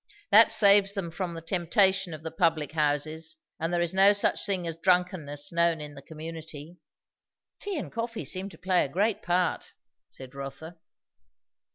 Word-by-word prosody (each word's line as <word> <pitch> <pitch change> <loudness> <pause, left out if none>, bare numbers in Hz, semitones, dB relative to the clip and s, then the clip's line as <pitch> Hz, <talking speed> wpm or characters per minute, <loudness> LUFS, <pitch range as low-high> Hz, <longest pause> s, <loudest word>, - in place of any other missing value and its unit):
That 225 +1 +7
saves 200 -2 +5
them 180 -4 -4
from 175 0 -4
the 165 - -8
temptation 190 +2 +1
of 155 - -13
the 160 - -5
public 160 -3 0
houses; 155 +1 -2 0.2
and 165 +1 -2
there 175 0 +1
is 175 +1 -2
no 195 +2 +6
such 205 - 0
thing 190 -3 -1
as 165 -1 -3
drunkenness 165 -5 0
known 170 -1 +2
in 150 -1 -8
the 140 - -11
community." 160 +1 -9 0.8
"Tea 405 -4 -3
and 290 - -5
coffee 230 0 -4
seem 190 +1 -2
to 165 - -15
play 180 +1 +1
a - - -4
great 200 +8 0
part," 180 -1 -1 0.4
said 130 0 -11
Rotha. 150 +5 -9
170 Hz, 170 wpm, -27 LUFS, 160-190 Hz, 0.8 s, That